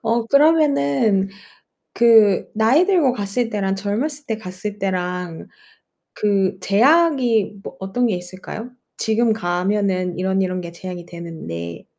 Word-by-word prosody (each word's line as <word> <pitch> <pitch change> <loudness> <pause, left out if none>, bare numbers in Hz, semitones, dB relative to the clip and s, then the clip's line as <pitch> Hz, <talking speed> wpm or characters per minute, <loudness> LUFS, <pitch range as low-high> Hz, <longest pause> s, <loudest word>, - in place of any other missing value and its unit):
어 230 0 0
그러면은 225 - +3 0.7
그 225 -4 +5
나이 250 - +3
들고 335 -10 +3
갔을 220 +2 -2
때랑 195 -2 -1
젊었을 270 +9 -2
때 220 - -2
갔을 200 +1 -7
때랑 180 -3 -3 0.7
그 195 -2 0
제약이 245 - +3
뭐 - - -8
어떤 215 +6 -1
게 210 - 0
있을까요? 185 +6 -8 0.3
"지금 220 +1 +1
가면은 185 -2 -1
이런, 190 +1 0
이런 185 -1 -1
게 170 - -8
제약이 175 -1 -8
되는데 160 - -8
200 Hz, 250 characters per minute, -20 LUFS, 185-235 Hz, 0.7 s, 그